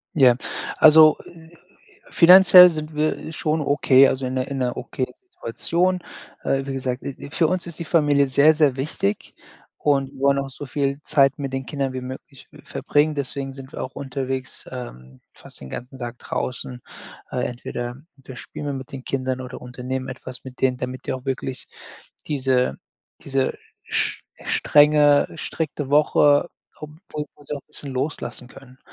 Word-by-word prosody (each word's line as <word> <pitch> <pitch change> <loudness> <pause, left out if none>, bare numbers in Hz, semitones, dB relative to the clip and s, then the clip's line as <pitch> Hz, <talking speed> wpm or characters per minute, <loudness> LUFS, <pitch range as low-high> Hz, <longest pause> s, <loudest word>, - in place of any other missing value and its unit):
Ja, 130 -5 +6 0.4
also, 155 0 +8
äh, 160 -1 -15 0.6
finanziell 180 +1 +9
sind 155 -1 -6
wir 155 +1 -2
schon 155 0 -1
okay, 140 -2 +5
also, 130 0 -1
in 130 - -3
'ner 130 0 -2
in 140 - -4
'ner 125 -2 -1
okayen 130 - -4
Situation. 185 - -2 0.4
Äh, 135 0 -1
wie 135 - -3
gesagt, 130 -1 -3
äh, - - -4
äh, 140 - -10
für 160 +2 +2
uns 180 +2 -1
ist 170 -3 -8
die 170 - -4
Familie 145 -4 +3
sehr, 140 +4 +5
sehr 150 -4 +2
wichtig 130 -7 -3 0.4
und 140 -2 +1
wir 135 - -14
wollen 140 0 +3
auch 135 0 -6
so 145 +2 -9
viel 140 +1 -2
Zeit 140 -1 +3
mit 140 -2 -4
den 135 0 -3
Kindern 135 -1 -3
wie 130 - -4
möglich 130 +1 -10
w - - -15
verbringen. 150 +1 0
Deswegen 140 -1 -4
sind 135 0 -11
wir - - -5
auch 130 - -6
unterwegs, 130 -1 -5
ähm, 65 - -9
fast - - -15
den 65 - -10
ganzen 125 +2 -8
Tag 120 -1 -6
draußen. 125 0 -5 0.5
Äh, 125 - -1
entweder 120 0 -5 0.2
wir 130 -2 -12
spielen 145 - -8
mal 145 - -2
mit 130 -1 -8
den 135 -2 -8
Kindern 130 -1 -2
oder 125 -1 -8
unternehmen 125 +1 -5
etwas 130 -1 -5
mit 130 -1 -11
denen, 130 -1 +2
damit 125 +1 -6
die - - -1
auch 130 -1 -6
wirklich 130 -1 -4 0.6
diese 130 -3 +1 0.5
diese 135 -1 -1 0.3
sch - - -1 0.2
strenge, 145 -1 +4
strikte 150 -3 -4
Woche 145 +1 +4 0.3
obwohl 150 0 -7
wir 145 - -19
sie 150 - -4
auch - - -9
'n - - -51
bisschen 140 - -7
loslassen 130 -1 -4
können. 130 0 -16
135 Hz, 175 wpm, -22 LUFS, 130-150 Hz, 0.6 s, finanziell